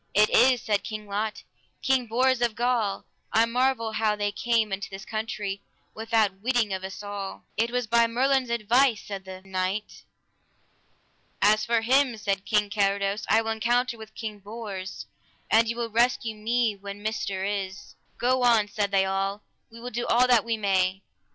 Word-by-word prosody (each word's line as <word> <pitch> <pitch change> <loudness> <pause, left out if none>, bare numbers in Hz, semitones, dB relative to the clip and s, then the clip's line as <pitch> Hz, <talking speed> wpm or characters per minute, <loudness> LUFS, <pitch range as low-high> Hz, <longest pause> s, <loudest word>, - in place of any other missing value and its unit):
It 210 +1 +5
is, 255 -2 +5
said 205 -2 0
King 215 -1 -6
Lot, 210 +2 -3 0.4
King 265 -2 +2
Bors 255 +2 +2
of 235 -3 +1
Gaul; 235 -4 0 0.3
I 225 +1 +4
marvel 245 -1 0
how 215 -1 +1
they 205 0 -1
came 225 -1 0
into 200 +1 -4
this 195 0 -9
country 215 -3 -4 0.3
without 220 -3 0
witting 235 -3 +1
of 190 0 -4
us 190 +2 -7
all. 205 -1 -6
It 230 +2 +1
was 245 0 -1
by 235 +1 +3
Merlin's 260 +2 +1
advice, 235 +1 +3
said 195 -2 -7
the 190 0 -9
knight. 190 +2 -3 1.4
As 215 +1 +4
for 230 0 +2
him, 255 +1 +3
said 200 -2 -2
King 210 -2 +1
Carados, 200 0 0
I 225 +1 +4
will 225 - -2
encounter 240 +2 +1
with 220 -1 -12
King 215 -2 -6
Bors, 200 -3 -7 0.5
an 225 +1 +5
ye 230 - -2
will 235 -1 -3
rescue 235 0 +1
me 225 0 0
when 200 +1 -9
myster 200 -3 -2
is. 195 -2 -4 0.2
Go 255 +1 +1
on, 230 -4 +4
said 205 -1 -1
they 195 -1 +3
all, 195 +1 -2 0.3
we 230 - -12
will 245 +1 -7
do 240 +1 -3
all 245 +2 +4
that 245 -3 +4
we 230 -1 -1
may. 195 -2 +1
220 Hz, 175 wpm, -26 LUFS, 200-235 Hz, 1.4 s, It